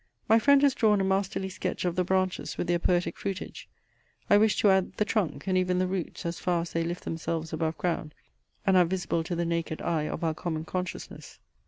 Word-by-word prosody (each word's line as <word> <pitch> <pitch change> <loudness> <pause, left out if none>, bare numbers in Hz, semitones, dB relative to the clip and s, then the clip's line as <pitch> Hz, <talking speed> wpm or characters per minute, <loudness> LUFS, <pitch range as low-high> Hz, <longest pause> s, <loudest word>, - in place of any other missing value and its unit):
My 225 +1 +6
friend 280 +3 +5
has 280 -2 +5
drawn 210 -3 +3
a - - +1
masterly 190 0 0
sketch 185 - -3
of 175 -1 0
the 185 - +2
branches 185 0 -1
with - - -1
their 175 0 +1
poetic 175 0 +1
fruitage. 195 -2 -5 0.6
I 205 - +8
wish 215 0 +3
to 205 - +6
add 190 -1 +2
the 210 - 0
trunk, 210 -6 -1
and 190 -1 0
even 185 0 +2
the 185 - +2
roots 185 -2 -4
as 170 0 -3
far 175 -2 +1
as 170 - -8
they 165 - 0
lift 175 +1 -4
themselves 165 0 -3
above 160 0 -1
ground, 165 -3 -2 0.5
and 195 - +4
are 180 - +6
visible 170 -2 -1
to 175 +2 -3
the 170 0 -1
naked 165 -1 -2
eye 155 -3 -1
of 165 - -4
our 160 -1 +1
common 160 -1 -4
consciousness. 180 +1 -6
180 Hz, 220 wpm, -28 LUFS, 165-190 Hz, 0.6 s, I